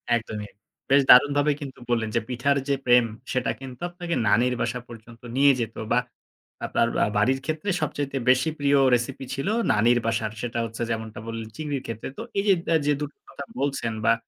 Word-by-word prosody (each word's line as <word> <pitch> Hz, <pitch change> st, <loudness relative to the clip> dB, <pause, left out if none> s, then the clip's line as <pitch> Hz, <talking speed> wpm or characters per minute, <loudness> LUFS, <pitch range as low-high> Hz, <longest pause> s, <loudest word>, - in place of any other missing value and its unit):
একদমই। 110 Hz, -3 st, -4 dB, 0.4 s
বেশ 140 Hz, +1 st, +6 dB
দারুণভাবে 145 Hz, +3 st, +7 dB
কিন্তু 135 Hz, -3 st, -8 dB
বললেন 115 Hz, -2 st, +1 dB
যে -, -, +4 dB
পিঠার 130 Hz, +3 st, +1 dB
যে 140 Hz, -, +2 dB
প্রেম, 125 Hz, -1 st, +6 dB, 0.3 s
সেটা 130 Hz, -1 st, 0 dB
কিন্তু 130 Hz, 0 st, -10 dB
আপনাকে 175 Hz, -1 st, -4 dB
নানির 125 Hz, +5 st, +3 dB
বাসা 120 Hz, +1 st, -1 dB
পর্যন্ত 115 Hz, 0 st, -13 dB
নিয়ে 140 Hz, +1 st, +6 dB
যেত 115 Hz, -1 st, -3 dB, 0.2 s
বা 120 Hz, -, +4 dB, 0.7 s
আপনার 115 Hz, -, +1 dB, 0.2 s
আ -, -, -1 dB
বাড়ির 130 Hz, +6 st, +2 dB
ক্ষেত্রে 155 Hz, +5 st, -3 dB
সবচাইতে 145 Hz, -2 st, -2 dB
বেশি 130 Hz, +4 st, +4 dB
প্রিয় 140 Hz, 0 st, +3 dB, 0.2 s
recipe 125 Hz, +3 st, -3 dB
ছিল 135 Hz, -, -3 dB, 0.3 s
নানির 120 Hz, +3 st, +3 dB
বাসার। 110 Hz, -1 st, -1 dB
সেটা 120 Hz, -1 st, -3 dB
হচ্ছে 115 Hz, +1 st, -7 dB
যেমনটা 110 Hz, 0 st, -4 dB
বললেন 115 Hz, -1 st, -5 dB
চিংড়ির 145 Hz, -4 st, -3 dB
ক্ষেত্রে। 115 Hz, -1 st, -5 dB
তো -, -, -5 dB, 0.2 s
এই -, -, +1 dB, 0.4 s
যে 150 Hz, -, +4 dB
২ 150 Hz, -, -2 dB
টো -, -, -53 dB
কথা 140 Hz, -, -7 dB, 0.2 s
বলছেন 135 Hz, -5 st, -1 dB
বা -, -, +6 dB
125 Hz, 180 wpm, -25 LUFS, 115-140 Hz, 0.7 s, দারুণভাবে